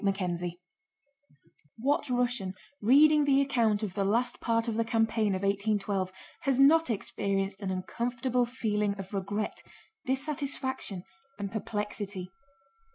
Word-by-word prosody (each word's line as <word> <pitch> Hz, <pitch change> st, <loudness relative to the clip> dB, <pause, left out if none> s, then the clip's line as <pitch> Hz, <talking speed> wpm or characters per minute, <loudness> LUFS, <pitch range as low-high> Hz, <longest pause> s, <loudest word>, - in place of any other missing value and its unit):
CHAPTER 195 Hz, -1 st, +1 dB
XIX 175 Hz, 0 st, -3 dB, 1.3 s
What 280 Hz, +4 st, 0 dB
Russian, 245 Hz, -6 st, 0 dB, 0.3 s
reading 295 Hz, +6 st, +6 dB
the 275 Hz, -1 st, +4 dB
account 230 Hz, -6 st, +2 dB
of 200 Hz, -4 st, -3 dB
the 200 Hz, -, 0 dB
last 235 Hz, +5 st, +1 dB
part 230 Hz, 0 st, +1 dB
of 230 Hz, -, 0 dB
the 230 Hz, +1 st, +1 dB
campaign 225 Hz, -2 st, +1 dB
of 185 Hz, -, -4 dB
1812, 200 Hz, -1 st, 0 dB, 0.3 s
has 270 Hz, -1 st, +1 dB
not 320 Hz, +3 st, +6 dB
experienced 195 Hz, -2 st, -1 dB
an 195 Hz, -, -2 dB
uncomfortable 245 Hz, +6 st, -1 dB
feeling 210 Hz, -4 st, -1 dB
of 195 Hz, +1 st, -8 dB
regret, 205 Hz, +2 st, -2 dB, 0.5 s
dissatisfaction, 265 Hz, -, -2 dB, 0.3 s
and 200 Hz, -1 st, -4 dB
perplexity? 205 Hz, -3 st, -4 dB
220 Hz, 125 wpm, -29 LUFS, 200-250 Hz, 1.3 s, reading